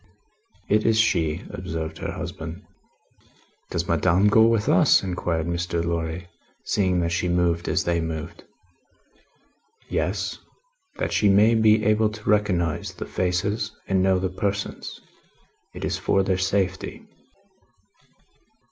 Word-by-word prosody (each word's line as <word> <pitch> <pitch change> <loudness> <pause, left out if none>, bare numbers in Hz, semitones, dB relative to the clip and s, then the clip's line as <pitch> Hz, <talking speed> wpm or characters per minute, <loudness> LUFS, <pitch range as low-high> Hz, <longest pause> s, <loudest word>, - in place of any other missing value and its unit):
"It 105 +1 +2
is 110 -1 +3
she," 85 -7 +1
observed 80 -4 -5
her - - -4
husband. 85 +5 -7 1.0
"Does 85 0 -2
Madame 90 +5 +3
go 110 +2 +6
with 115 -2 +1
us?" 90 - +5
inquired 90 -3 -2
Mr. 85 0 -2
Lorry, 85 +1 -3 0.4
seeing 90 -3 +1
that 85 0 -1
she 85 +1 0
moved 85 -1 +1
as - - +1
they 85 -1 0
moved. 80 0 -5 1.5
"Yes. - - -2 0.6
That - - -2
she 105 - +3
may 105 +4 +5
be 110 -1 +4
able 110 +1 +3
to 105 0 -11
recognise 90 -7 +1
the - - -7
faces 100 +4 -1
and 95 -1 +2
know 95 0 +3
the 95 0 -1
persons. 100 +2 -4 0.8
It - - -4
is - - -2
for 95 - +2
their 95 -1 0
safety." 95 0 -1
90 Hz, 130 wpm, -24 LUFS, 85-105 Hz, 1.5 s, go